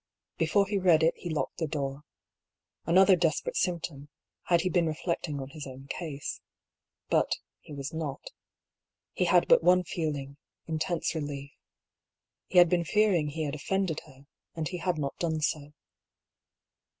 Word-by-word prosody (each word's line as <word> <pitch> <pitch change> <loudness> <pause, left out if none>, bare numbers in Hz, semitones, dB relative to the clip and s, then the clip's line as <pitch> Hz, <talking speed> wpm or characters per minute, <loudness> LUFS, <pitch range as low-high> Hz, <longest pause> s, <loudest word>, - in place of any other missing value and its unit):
Before 185 +5 +3
he 200 0 -1
read 170 -4 +5
it 165 - +4
he 175 - -7
locked 150 -4 -2
the 160 - 0
door. 140 -2 -3 0.9
Another 190 +3 +6
desperate 180 - 0
symptom, 165 - -2 0.4
had 170 -1 +3
he 185 - 0
been 175 -3 +2
reflecting 155 -2 -2
on 135 0 -6
his 150 -2 -7
own 135 +1 -10
case. 145 0 -5 0.7
But - - +2 0.2
he - - -15
was 140 +1 -5
not. 155 -4 -5 0.8
He - - +1
had - - +4
but - - +6
one 180 0 +5
feeling, 145 -5 -3 0.3
intense 165 +2 -1
relief. 145 -3 -5 1.0
He 180 - -1
had 175 0 +9
been 175 0 +2
fearing 195 -4 +2
he 155 +2 -3
had 145 -2 -2
offended 170 +2 -1
her, 135 -1 -17 0.3
and 160 -2 -2
he 180 - -4
had 175 -1 -1
not 140 -2 -3
done 160 -2 0
so. 150 -1 -1
160 Hz, 155 wpm, -29 LUFS, 145-180 Hz, 1.0 s, had